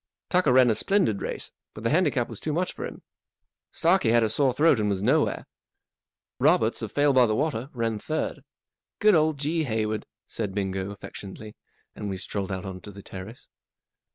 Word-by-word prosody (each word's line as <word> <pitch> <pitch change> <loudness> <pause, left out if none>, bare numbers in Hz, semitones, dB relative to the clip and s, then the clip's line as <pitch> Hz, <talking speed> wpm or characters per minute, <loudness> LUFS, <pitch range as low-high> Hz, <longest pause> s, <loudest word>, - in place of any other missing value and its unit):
Tucker 180 -6 +3
ran 125 -2 +6
a - - +3
splendid 170 - +1
race, - - -4 0.2
but 110 - -8
the 115 - +1
handicap 150 -7 +2
was 115 - -9
too 155 - -3
much 180 +3 -1
for - - -5
him. - - -11 0.7
Starkie 170 -6 +3
had 120 0 +4
a 110 - +2
sore 135 +4 +3
throat 145 0 +4
and 105 -1 +1
was 100 -1 -1
nowhere. 145 +7 +2 0.9
Roberts, - - +3
of - - -4
Fale 145 -1 +3
by 125 -2 +5
the 110 - +1
Water, 140 -2 -1
ran 115 -3 -2
third. 155 +8 -3 0.6
Good 215 -1 +5
old 155 -2 +3
G. 155 +3 0
Hayward! 110 -3 -2
" - - -67
said 105 -4 -4
Bingo, 95 -1 -2
affectionately, 100 +1 -9 0.4
and 105 -1 -5
we 95 - -3
strolled 100 +1 -4
out 95 +1 -4
on 95 -1 -7
to - - -10
the 100 0 -12
terrace. 95 +5 -9
115 Hz, 190 wpm, -26 LUFS, 105-150 Hz, 0.9 s, ran